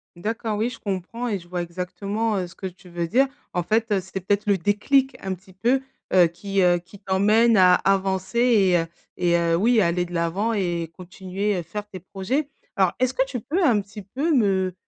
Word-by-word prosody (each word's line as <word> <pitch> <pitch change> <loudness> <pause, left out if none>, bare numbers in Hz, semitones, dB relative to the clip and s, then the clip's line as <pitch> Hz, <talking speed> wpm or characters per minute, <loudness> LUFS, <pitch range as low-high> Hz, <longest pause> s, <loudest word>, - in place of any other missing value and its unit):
D'accord, 220 +4 -3
oui, 225 +3 0
je 230 - -10
comprends 205 +5 -4
et 205 -4 -1
je 175 - -16
vois 180 0 -2
exactement, 200 +5 -3
heu, 185 -2 -2
ce 175 - -16
que 190 - -5
tu 180 0 -14
veux 170 -1 -3
dire. 255 +11 +3 0.2
En 180 - -1
fait, 220 +4 0
heu, 200 - +3
c'était 190 +1 -6
peut-être 200 +3 0
le 200 -2 +3
déclic, 255 - +1
un 190 -1 -3
petit 190 +2 -13
peu, 240 +8 +1 0.3
heu, 180 -2 +6
qui, 195 +4 -2
heu, 175 -1 +4
qui 180 +3 -16
t'emmène 210 +4 +3
à 180 -1 +7
avancer 195 +3 0
et 210 -7 +4
heu, 165 - 0 0.3
et 175 -1 +2
heu, 170 -1 +2
oui, 225 +4 +4
aller 175 0 +1
de 175 - -11
l'avant 175 +7 0
et 175 -5 -1
continuer, 190 +2 -3
heu, 175 - -3
faire 205 +5 -6
tes 185 - -8
projets. 200 - -2 0.3
Alors, 190 -3 +3
est-ce 255 0 +1
que 265 +1 +1
tu 250 -3 -5
peux 325 - -1
un 225 -8 +4
petit 200 +1 -11
peu 275 - -2
me 190 -7 +2
195 Hz, 220 wpm, -23 LUFS, 180-225 Hz, 0.3 s, à